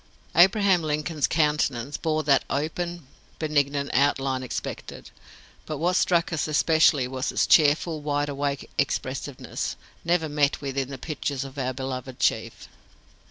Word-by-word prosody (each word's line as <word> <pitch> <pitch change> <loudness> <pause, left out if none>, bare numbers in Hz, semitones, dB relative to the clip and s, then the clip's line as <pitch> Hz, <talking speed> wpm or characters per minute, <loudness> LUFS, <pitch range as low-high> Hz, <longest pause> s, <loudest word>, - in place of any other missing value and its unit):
"Abraham 190 +1 +5
Lincoln's 150 -1 -1
countenance 150 -4 0
bore 155 -1 -1
that 140 -2 +3
open, 170 +3 -3 0.3
benignant 145 -2 0
outline 135 -1 +2
expected; 130 - -6 0.6
but 155 - -3
what 175 +4 +1
struck 175 -2 +2
us 155 - -1
especially 155 -3 +3
was 130 0 -3
its - - +2
cheerful, 155 +1 +4
wide 145 0 -1
awake 140 -1 -3
expressiveness, - - -2 0.3
never 170 -1 +1
met 145 -1 +1
with 135 -2 -5
in 135 -1 -1
the 135 - -6
pictures 140 -1 -3
of 135 +1 -8
our 130 -1 -1
beloved 130 -1 -5
chief. - - -1
145 Hz, 135 wpm, -25 LUFS, 135-160 Hz, 0.6 s, Abraham